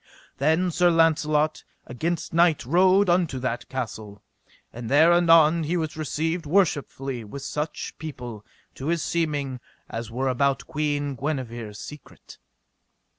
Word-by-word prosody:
Then 160 +6 +2
Sir 175 +1 +3
Launcelot 155 -2 +2 0.2
against 160 +9 -3
night 170 -4 +3
rode 185 +7 +4
unto 175 -6 +2
that 125 -2 -3
castle, 110 -5 -6 0.5
and 115 -1 -7
there 160 +5 +6
anon 165 -1 +5
he 165 +4 -1
was 160 -2 -3
received 160 +2 -2
worshipfully 140 - 0
with 135 +6 -8
such 150 +2 -4
people, 125 -8 -7 0.3
to 135 - -7
his 165 -1 0
seeming, 145 -6 -1 0.3
as 115 -1 -6
were 130 +3 -2
about 135 +2 +1
Queen 145 -1 -2
Guenever 120 -5 -4
secret. 145 +8 -12
150 Hz, 125 wpm, -25 LUFS, 130-165 Hz, 0.5 s, there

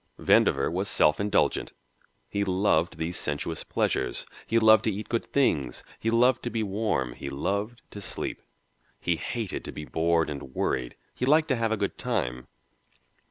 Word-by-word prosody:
Vandover 70 +2 +3
was 95 +3 -1
self 75 -4 +3
indulgent 100 0 +1 0.5
he 100 - -1
loved 90 -3 +1
these 80 +2 -2
sensuous 75 +2 -3
pleasures, - - -1 0.2
he 115 - +2
loved 110 -1 +6
to 110 - +2
eat 105 +2 -6
good 115 - -1
things, 75 - +1 0.2
he 115 - 0
loved 120 +2 +4
to - - -3
be 110 0 -1
warm, 100 - -1
he 70 - -6
loved 100 +11 -2
to 100 - -8
sleep. 90 - -4 0.6
He 85 - +1
hated 115 -1 -4
to - - -5
be 75 - -7
bored 80 +1 +1
and 70 -2 -8
worried 65 -2 -1 0.2
he 125 - -2
liked 155 +2 +4
to 130 - +3
have 115 -1 0
a 110 - +1
good 100 -1 -2
time. 65 - -2
100 Hz, 170 wpm, -27 LUFS, 80-115 Hz, 0.6 s, loved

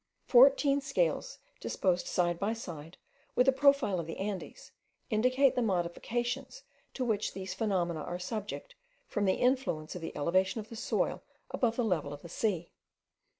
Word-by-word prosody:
Fourteen 275 +2 +6
scales, - - 0 0.2
disposed 180 -2 0
side 175 -1 +1
by 210 +3 0
side 170 -7 -8 0.4
with 250 - +4
a - - +8
profile 275 -8 +3
of 165 - -4
the 165 - -6
Andes, 195 -1 -5 0.4
indicate 255 +5 +3
the 250 - 0
modifications 240 - -2 0.3
to 255 - -1
which 215 -3 0
these 190 -1 -5
phenomena 185 -5 0
are 175 +3 -4
subject 215 - -5 0.3
from 205 -1 -1
the 190 - +3
influence 250 - 0
of 180 - -7
the 165 - -6
elevation 185 +8 +1
of 215 0 -8
the 230 - -8
soil 225 - -1 0.3
above 230 -2 +1
the 245 - 0
level 160 -8 0
of 145 - -10
the 170 - -9
sea. 175 -3 -1
210 Hz, 160 wpm, -31 LUFS, 175-250 Hz, 0.4 s, a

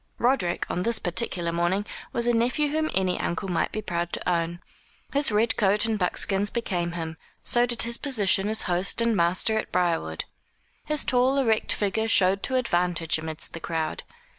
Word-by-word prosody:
Roderick, 235 -9 +1
on 180 - -2
this 230 +4 +3
particular 175 -3 -1
morning, 175 +4 0 0.3
was 235 - -1
a 240 - +3
nephew 250 +6 +1
whom 310 +1 0
any 185 -1 +1
uncle 175 +3 -2
might 175 -2 0
be 215 - -4
proud 175 -2 -2
to - - -3
own. 170 -1 0 0.5
His 285 -3 +1
red 220 +2 +2
coat 205 +1 +4
and 220 -2 -1
buckskins 195 +2 +1
became 180 -7 -2
him; 160 -1 -5 0.3
so 240 0 +2
did 240 -1 +1
his 235 0 -1
position 210 -6 +2
as 220 - +1
host 180 +4 0
and 230 -1 +3
master 185 +5 +2
at - - -6
Briarwood. 165 - 0 0.6
His 300 -1 0
tall 255 +2 +3
erect 225 -5 +1
figure 215 +2 0
showed 195 -2 +3
to 260 - -2
advantage 175 -9 +1
amidst 160 0 -6
the 165 - -6
crowd. 160 -1 -3
195 Hz, 180 wpm, -26 LUFS, 175-235 Hz, 0.6 s, coat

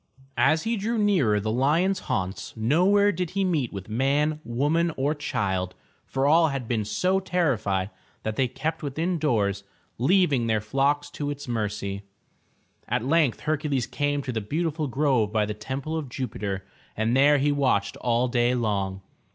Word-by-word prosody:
As 160 0 +3
he 230 0 0
drew 225 +4 -1
nearer 175 - +3
the 110 +2 -2
lion's 160 - +2
haunts, 95 +3 -3
nowhere 185 - +4
did 180 -2 -3
he 195 - +3
meet 160 -10 0
with 100 -2 -7
man, 140 +7 +1
woman 150 +8 +1
or 140 +3 +1
child, 95 -10 -2 0.3
for 135 +1 -1
all 160 +3 +5
had 135 -5 -3
been 110 -3 0
so 185 - +1
terrified, 115 - 0 0.3
that 110 0 -2
they 130 +1 +2
kept 160 +6 -3
within 160 +5 -2
doors, 100 -9 0 0.4
leaving 140 -4 +3
their 110 -1 +2
flocks 140 +6 0
to 145 0 -4
its 145 0 -6
mercy. 105 -4 -3 0.9
At 115 - -1
length 150 -3 +2
Her 155 0 0
cules 140 -5 -1
came 145 -1 0
to 130 - -3
the 115 -2 -2
beautiful 155 +6 -2
grove 130 -5 +1
by 105 -1 +2
the 105 - -3
Temple 130 +8 -4
of 155 -5 -4
Jupiter 100 -6 -4 0.3
and 110 +3 +1
there 145 +2 +5
he 145 +1 +2
watched 125 -8 +1
all 120 +1 +1
day 120 0 +2
long. 100 -5 -1
135 Hz, 170 wpm, -25 LUFS, 110-155 Hz, 0.9 s, all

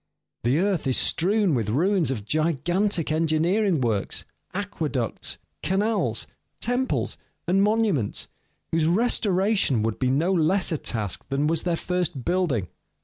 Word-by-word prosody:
The 125 +5 +2
earth 185 -4 +1
is 130 - +2
strewn 195 +1 +2
with 115 -5 0
ruins 170 - +2
of 110 -7 -3
gigantic 170 - 0
engineering 165 +3 +2
works, 110 -5 -1 0.3
aqueducts, 155 - -2 0.2
canals, 205 +6 +1 0.3
temples, 245 +2 -1 0.3
and 190 +3 +3
monuments, 205 - +1 0.4
whose 160 -1 +2
restoration 195 - +2
would 110 -1 -2
be 130 - +1
no 160 +8 +2
less 180 +3 +2
a 160 - -1
task 105 -5 -3
than 140 +2 0
was 165 +2 +1
their 175 -2 +1
first 175 -7 -2
building. 170 - +1
165 Hz, 130 wpm, -25 LUFS, 135-195 Hz, 0.4 s, and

